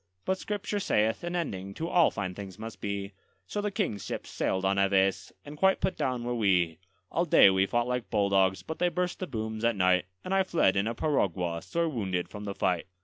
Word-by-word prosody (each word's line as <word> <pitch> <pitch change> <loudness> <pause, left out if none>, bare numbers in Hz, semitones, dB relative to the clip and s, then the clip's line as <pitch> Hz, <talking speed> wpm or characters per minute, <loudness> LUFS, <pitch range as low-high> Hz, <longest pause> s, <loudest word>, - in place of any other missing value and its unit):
But 190 0 0
Scripture 205 0 -3
saith, 110 - +1
an 175 +1 -3
ending 100 - -3
to 165 - -3
all 170 -2 +4
fine 95 -2 -4
things 95 -1 -8
must 110 +1 -8
be; 100 -1 -3 0.3
So 205 - -3
the 210 - -1
King's 190 - -2
ships - - -5
sailed 95 0 -1
on 100 +1 +2
Aves, 95 0 +2
and 145 +1 -8
quite 190 0 +4
put 190 0 0
down 125 -2 -1
were 120 0 -2
we. 90 -7 +2 0.3
All 170 - +1
day 100 - +7
we 95 0 +2
fought 120 +2 +1
like 125 -1 -2
bulldogs, 95 -3 +2
but 160 - -6
they 180 - +3
burst 180 +1 -2
the 185 - -3
booms 110 -3 -4
at 115 -1 +2
night; 90 -1 +3 0.2
And 190 - -2
I 195 - +4
fled 170 - +2
in 100 +2 +1
a 115 - -2
piragua, 90 - 0
sore 170 - -1
wounded, 95 - -2
from 105 -1 -8
the 100 -1 -4
fight. 90 -2 0
110 Hz, 220 wpm, -29 LUFS, -, 0.3 s, day